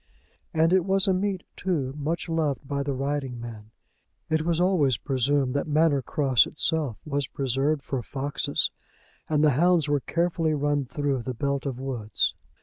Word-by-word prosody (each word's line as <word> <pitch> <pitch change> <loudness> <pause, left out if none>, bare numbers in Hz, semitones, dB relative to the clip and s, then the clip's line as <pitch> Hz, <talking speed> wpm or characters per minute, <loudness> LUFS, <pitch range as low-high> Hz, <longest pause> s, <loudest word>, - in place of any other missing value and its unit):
And 160 +2 +3
it 190 -2 +4
was 195 +2 +2
a 190 - +4
meet, 190 0 -1
too, 150 -8 -1
much 155 +4 -2
loved 155 -5 -1
by 140 0 -1
the 140 0 -2
riding 135 -2 -2
men. 110 -2 -8 0.6
It 160 0 +3
was 165 +1 0
always 170 - +3
presumed 135 -1 +1
that 140 - -1
Manor 150 -2 +3
Cross 130 -1 +3
itself 155 - -1
was 145 -3 -1
preserved 140 +2 0
for 135 -3 -2
foxes, 140 +4 -1 0.6
and 150 -1 +2
the 150 - +6
hounds 170 +3 +3
were 145 0 +2
carefully 165 +1 0
run 145 -1 0
through 140 0 -1
the 125 +1 -4
belt 140 +2 -1
of 130 -2 -4
woods. 125 -6 -1
145 Hz, 165 wpm, -26 LUFS, 135-160 Hz, 0.6 s, the